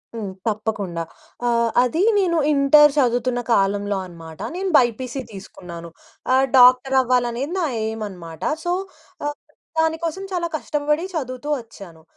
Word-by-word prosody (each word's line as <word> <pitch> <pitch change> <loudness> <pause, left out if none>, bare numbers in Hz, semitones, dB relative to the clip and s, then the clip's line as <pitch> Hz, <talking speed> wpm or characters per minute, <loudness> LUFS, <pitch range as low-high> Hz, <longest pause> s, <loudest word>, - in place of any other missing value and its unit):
హ్మ్. 205 -4 -5
తప్పకుండా. 205 -6 -2 0.4
ఆహ్, 235 -1 +2
అదీ 320 +9 0 0.2
నేను 345 -3 +1 0.2
ఇంటర్ 290 +1 +6
చదువుతున్న 245 -2 +1
కాలంలో 200 0 +1
అనమాట. 165 -2 -12 0.2
నేను 380 +1 -2
బైపీసీ 250 +2 0
తీసుకున్నాను. 175 -4 -10 0.4
ఆహ్, 265 +1 +4
డాక్టరవ్వాలనేది 255 +2 +4
నా 345 - +1 0.2
ఎయిమనమాట. 190 -7 -6 0.2
సో, 350 - 0 0.5
ఆహ్, 290 0 -3 0.4
దానికోసం 320 +3 -1
చాలా 345 -1 -1
కష్టపడి 300 +2 -1
చదువుతూ 260 -1 -4
వచ్చాను. 185 -8 -14
245 Hz, 115 wpm, -21 LUFS, 205-295 Hz, 0.5 s, ఇంటర్